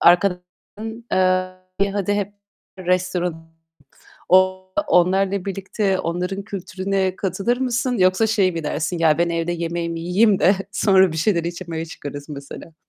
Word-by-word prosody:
arkadaşların, 195 +5 0
eee, 185 +1 0
hadi, 205 0 0
hep 205 0 -2 0.4
restoran 180 -2 -1 0.8
o 185 0 +4 0.2
onlarla 190 -3 +2
birlikte 195 0 -1
onların 180 +4 -3
kültürüne 190 -1 -2
katılır 195 +6 -1
mısın 250 -1 -1
yoksa 185 +4 +4
şey 200 -4 +2
mi 165 -2 -4
dersin? 155 +3 -2
"Ya 160 -2 +3
ben 170 0 +2
evde 170 0 -1
yemeğimi 170 0 -3
yiyeyim 190 +4 +3
de 190 - +5 0.2
sonra 190 -2 +4
bir - - -5
şeyler 170 +1 +1
içmeye 170 -1 -4
çıkarız." 145 -3 -8
mesela. 145 +2 -9
185 Hz, 130 wpm, -21 LUFS, 170-195 Hz, 0.8 s, de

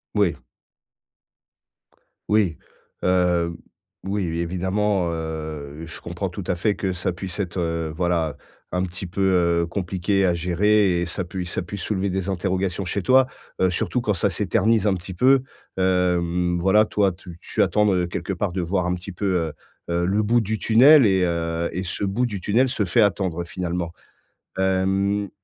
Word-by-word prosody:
Oui. 100 -5 +2 1.9
Oui. 100 -8 +2 0.5
Heu, 90 -2 +2 0.5
oui, 100 +1 -1
évidemment, 95 +3 0
heu, 80 -2 -5
je 85 - -10
comprends 90 +3 -4
tout 90 +2 -7
à 90 - +1
fait 100 +4 0
que 95 - -2
ça 90 0 -2
puisse 90 +1 -7
être, 95 -2 -3
heu, 80 -2 -2
voilà, 85 -3 0 0.4
un 90 0 +1
petit 95 +1 -5
peu, 95 +3 -4 0.4
heu, - - 0
compliqué 95 +2 0
à 90 - +3
gérer 90 +2 +2
et - - 0
ça 85 +3 -3
puisse 90 0 -5
ça - - -1
puisse 95 +2 -6
soulever 100 -2 -1
des 95 0 -2
interrogations 95 0 -1
chez 95 +3 -2
toi. 130 +6 +5 0.3
Heu, 95 - +4
surtout 95 +7 -1
quand 110 -3 0
ça 95 +2 +1
s'éternise 105 +3 +1
un 100 - +3
petit 90 +1 -7
peu, 130 +7 +4 0.3
hem, 90 -1 +1
voilà, 95 +4 +4
toi, 100 -3 +1
tu 85 -1 -12
tu - - -2
attends, 105 -2 +2
heu, 90 -1 +1
quelque 95 +2 -4
part 95 +1 -2
de 90 +1 -2
voir 90 +1 0
un 90 - 0
petit 90 +2 -8
peu, 100 - -4
heu 80 -4 -1 0.4
heu, 85 +1 +1
le 100 +4 +2
bout 115 +3 +3
du 110 0 -2
tunnel 130 +5 +7
et 95 -3 +3
heu 85 -1 -1
et 90 - -3
ce 90 +2 -4
bout 100 +6 0
du 105 -6 -4
tunnel 120 +8 +2
se 120 -4 -1
fait 100 +5 +2
attendre 95 -4 0
finalement. 85 -1 -3 0.6
Hem, 95 +1 +1
95 Hz, 175 wpm, -23 LUFS, 85-100 Hz, 1.9 s, tunnel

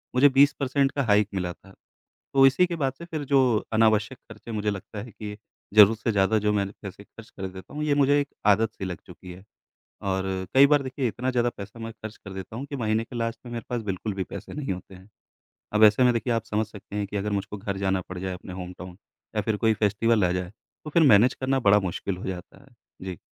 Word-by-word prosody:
मुझे 130 +3 +7
20 140 +2 +5
परसेंट 135 0 +1
का 140 - -1
हाइक 105 -3 +3
मिला 90 -2 -2
था। 95 +2 -19 0.6
तो 135 0 +6
इसी 135 +7 +4
के 175 - -4
बाद 135 -2 +1
से 170 - -8
फ़िर 155 -4 -5
जो 140 0 +4 0.3
अनावश्यक 110 +3 +2
खर्चे 115 - -9
मुझे 105 -1 -1
लगता 100 +1 -6
है 120 - -10
कि 105 0 -8 0.4
ज़रूरत 105 +1 +8
से 115 - -1
ज़्यादा 100 +2 +3
जो 105 - +3
मैंने 100 -1 -1
पैसे 100 +1 -9
खर्च 115 +1 -15
कर 95 - -6
देता 95 +8 -11
हूँ 150 - -2
ये 150 -1 +2
मुझे 145 0 +4
एक 140 - -3 0.2
आदत-सी 110 0 +1
लग 90 -4 -4
चुकी 90 - -11
है। 90 +2 -13 0.6
और 95 -1 -1 0.3
कई 140 +1 +8
बार 145 -1 +3
देखिए 130 -1 -2
इतना 125 +3 -2
ज़्यादा 120 -1 +1
पैसा 105 +3 -9
मैं 115 0 -6
खर्च 110 0 -9
कर 100 - -8
देता 95 +3 -7
हूँ 135 - -4
कि 140 - -5
महीने 110 -2 0
के 120 - -10
लास्ट 115 0 -2
में 120 - -8
मेरे 115 -2 -5
पास 120 -2 -2
बिल्कुल 100 +1 -3
भी 95 -1 -2
पैसे - - -8
नहीं 145 -9 -3
होते 90 +1 -9
हैं। 95 +2 -15 0.7
अब 105 - +4
ऐसे 105 +4 +6
में 125 -1 +5
देखिए 115 +1 0
आप 115 - 0
समझ 110 +1 -1
सकते 105 -1 -11
हैं 105 -1 -1
कि 100 +1 -4
अगर 105 +1 -2
मुझको 100 +1 -3
घर 100 0 -4
जाना 95 -1 0
पड़ 90 -1 -6
जाए 95 0 -3
अपने 90 0 -9
होमटाउन 90 0 -8 0.4
या 105 - +2
फ़िर 110 -1 -1
कोई 110 +1 +3
फेस्टिवल 105 +1 +2
आ 90 - +1
जाए। 90 0 -3
तो 120 +7 -14
फ़िर 165 +2 +4
मैनेज 115 +2 +6
करना 135 0 0
बड़ा 105 +1 +6
मुश्किल 90 +2 -4
हो - - -8
जाता 95 +6 -7
है। 135 - -21 0.3
जी। 95 -3 -6
110 Hz, 245 wpm, -26 LUFS, 95-125 Hz, 0.7 s, ज़रूरत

